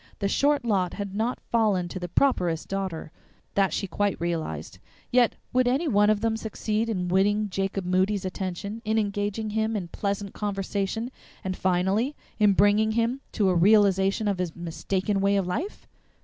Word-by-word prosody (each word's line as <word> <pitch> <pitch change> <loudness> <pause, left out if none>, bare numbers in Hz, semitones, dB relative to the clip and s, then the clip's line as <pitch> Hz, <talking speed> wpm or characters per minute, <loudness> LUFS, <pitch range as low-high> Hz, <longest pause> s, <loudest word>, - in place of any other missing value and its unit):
The 200 - -1
short 285 +4 +2
lot 190 -5 +1
had 200 -2 -5
not 225 +4 -1
fallen 210 -6 +1
to 185 - -5
the 175 -1 -5
properest 175 - +1
Daughter, 190 -5 -4 0.4
that 195 -1 +2
she - - -1
quite 200 +2 -1
realized; 160 - -3 0.3
yet 245 -2 +4 0.2
would 255 0 +3
any 275 +7 +1
one 210 -5 +4
of 215 -1 +2
them 225 -1 +1
succeed 220 0 -2
in 185 -5 -1
winning 205 +3 +2
Jacob 195 0 -2
Moody's 190 +2 +1
attention, 190 +4 -4
in 220 0 0
engaging 205 +1 -1
him 220 +1 0
in 180 -5 -3
pleasant 200 +1 -3
conversation, 205 +3 -2 0.3
and 185 -1 -2
finally 190 +10 +1 0.2
in 210 -2 +5
bringing 205 +3 +3
him 235 +4 0
to 200 -3 +2
a - - +3
realization 195 +2 +4
of 200 -3 0
his 175 -3 -2
mistaken 185 +4 -2
way 200 0 +3
of 195 - +1
life? 295 - -4
200 Hz, 170 wpm, -26 LUFS, 185-220 Hz, 0.4 s, in